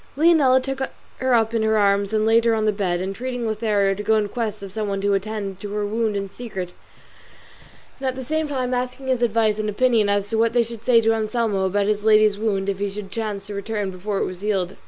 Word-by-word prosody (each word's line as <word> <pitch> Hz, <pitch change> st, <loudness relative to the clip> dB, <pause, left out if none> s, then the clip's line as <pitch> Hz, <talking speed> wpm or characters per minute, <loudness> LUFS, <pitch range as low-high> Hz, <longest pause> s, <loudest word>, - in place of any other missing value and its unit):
Leonela 295 Hz, -5 st, +5 dB
took 270 Hz, +1 st, -4 dB, 0.4 s
her 260 Hz, -1 st, +2 dB
up 225 Hz, 0 st, +2 dB
in 225 Hz, -, +1 dB
her 220 Hz, 0 st, +2 dB
arms 200 Hz, -1 st, +2 dB
and 215 Hz, 0 st, +1 dB
laid 225 Hz, +1 st, +4 dB
her 230 Hz, -1 st, +3 dB
on 215 Hz, -1 st, 0 dB
the 215 Hz, -, +3 dB
bed, 190 Hz, -4 st, -1 dB
entreating 235 Hz, +6 st, -4 dB
Lothario 210 Hz, -3 st, +1 dB
to 200 Hz, -, -5 dB
go 220 Hz, +1 st, +2 dB
in 210 Hz, -1 st, +1 dB
quest 215 Hz, -2 st, -4 dB
of 195 Hz, -, -7 dB
some 215 Hz, +1 st, -3 dB
one 195 Hz, -1 st, -2 dB
to 200 Hz, +1 st, +1 dB
attend 200 Hz, -1 st, -3 dB
to 205 Hz, +1 st, -6 dB
her 210 Hz, 0 st, -1 dB
wound 215 Hz, 0 st, -1 dB
in 195 Hz, 0 st, -3 dB
secret, 190 Hz, -4 st, -7 dB, 1.3 s
and 265 Hz, -, -3 dB
at 260 Hz, -, -1 dB
the 260 Hz, -, -5 dB
same 315 Hz, +4 st, -1 dB
time 255 Hz, -3 st, -2 dB
asking 250 Hz, +2 st, -3 dB
his 255 Hz, -2 st, +1 dB
advice 220 Hz, -2 st, +2 dB
and 215 Hz, 0 st, -1 dB
opinion 220 Hz, -1 st, +2 dB
as 200 Hz, 0 st, +1 dB
to 225 Hz, +1 st, -1 dB
what 230 Hz, 0 st, +2 dB
they 240 Hz, -1 st, +4 dB
should 230 Hz, -1 st, -9 dB
say 235 Hz, -1 st, +5 dB
to 225 Hz, 0 st, +3 dB
Anselmo 220 Hz, -3 st, 0 dB
about 200 Hz, +2 st, +1 dB
his 210 Hz, 0 st, 0 dB
lady's 215 Hz, -1 st, +4 dB
wound 200 Hz, -3 st, -1 dB
if 195 Hz, -1 st, -2 dB
he 205 Hz, 0 st, -1 dB
should 195 Hz, -1 st, -8 dB
chance 210 Hz, -3 st, -4 dB
to 210 Hz, -, -7 dB
return 200 Hz, 0 st, -3 dB
before 195 Hz, +2 st, -4 dB
it -, -, 0 dB
was 185 Hz, 0 st, -7 dB
healed. 195 Hz, -3 st, -1 dB
215 Hz, 245 wpm, -22 LUFS, 200-230 Hz, 1.3 s, Leonela